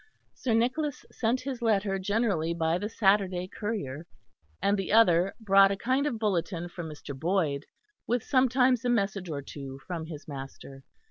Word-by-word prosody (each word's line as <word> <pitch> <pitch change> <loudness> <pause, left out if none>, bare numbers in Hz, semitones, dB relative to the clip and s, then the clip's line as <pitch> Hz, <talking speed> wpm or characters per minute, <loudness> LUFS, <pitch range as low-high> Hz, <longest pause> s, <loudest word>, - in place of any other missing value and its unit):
Sir 235 -4 -1
Nicholas 260 +6 0
sent 240 +2 0
his 260 -2 -5
letter 200 -4 +1
generally 190 -5 0
by 165 +1 +1
the 205 +2 -3
Saturday 195 -4 +2
courier, 175 - -4 0.5
and 200 +1 +2
the 195 -2 -3
other 190 -4 +5
brought 195 -2 +6
a 200 - -1
kind 260 +6 +1
of 240 - -2
bulletin 175 -4 -1
from 170 -2 -7
Mr. 145 -2 -8
Boyd, 160 -2 0 0.4
with 240 -1 0
sometimes 255 -2 +3
a 245 - 0
message 195 -5 0
or 140 -3 -4
two 135 -1 -8
from 165 -3 -5
his 150 -3 -9
master. 135 -1 -9
195 Hz, 160 wpm, -28 LUFS, 165-225 Hz, 0.5 s, brought